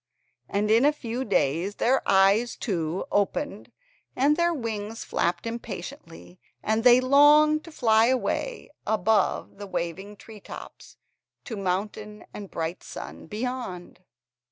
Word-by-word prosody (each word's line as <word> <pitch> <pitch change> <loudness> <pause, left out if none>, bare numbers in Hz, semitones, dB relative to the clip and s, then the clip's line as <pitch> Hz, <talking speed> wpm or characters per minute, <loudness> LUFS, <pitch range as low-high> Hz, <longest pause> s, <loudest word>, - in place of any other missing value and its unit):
And 210 +1 0
in 230 +3 +5
a 295 - +5
few 245 -3 -4
days 185 - 0
their 260 +3 +2
eyes, 200 +5 +4
too, 170 -4 -2
opened 205 +8 -1 0.4
and 285 +3 +3
their 340 +1 +2
wings 225 -6 -4
flapped 170 +2 -1
impatiently, 195 - -8 0.2
and 220 +1 0
they 250 0 +7
longed 295 +4 +5
to 330 - -11
fly 225 -5 +3
away 260 - -2 0.2
above 215 -1 +1
the 205 - -7
waving 190 +3 -4
tree 215 +1 -13
tops - - -11 0.5
to 230 - -6
mountain 205 +2 -3
and 205 - -7
the - - -17
bright 165 +2 -4
sun - - -9
beyond. 220 -4 -5
220 Hz, 130 wpm, -26 LUFS, 195-255 Hz, 0.5 s, they